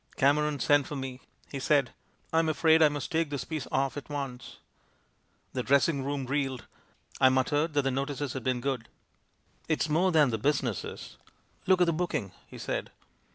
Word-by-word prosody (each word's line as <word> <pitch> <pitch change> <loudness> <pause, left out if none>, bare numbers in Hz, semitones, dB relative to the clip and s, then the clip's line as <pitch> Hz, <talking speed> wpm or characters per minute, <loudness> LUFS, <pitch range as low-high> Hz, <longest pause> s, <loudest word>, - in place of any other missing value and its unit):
"Cameron 145 +1 +2
sent 145 +3 +3
for 150 - -5
me; 130 -2 -5 0.3
he 140 - -4
said: 135 -3 +2 0.2
" - - -37
'I'm 160 0 +3
afraid 160 +1 +4
I 155 - +7
must 145 +2 -5
take 165 -2 +1
this 145 -2 -3
piece 155 -5 -5
off 135 0 0
at 145 - -7
once.' 140 -4 -6 1.0
"The 125 - -1
dressing 140 +2 +2
room 140 -1 -2
reeled. 135 -2 -2 0.5
I 130 - +7
muttered 145 +5 +1
that 145 - +3
the 135 - +1
notices 140 0 -2
had 130 - -5
been 125 -1 0
good. 130 -3 -3 0.4
" - - -37
'It's 155 0 +1
more 175 +5 +3
than 150 -6 +4
the 110 - -2
business 130 - 0
is. - - -9 0.5
Look 185 -1 +4
at - - +7
the 170 - +1
booking!' 155 - -2 0.2
he - - -11
said. - - -3
140 Hz, 190 wpm, -29 LUFS, 130-150 Hz, 1.0 s, I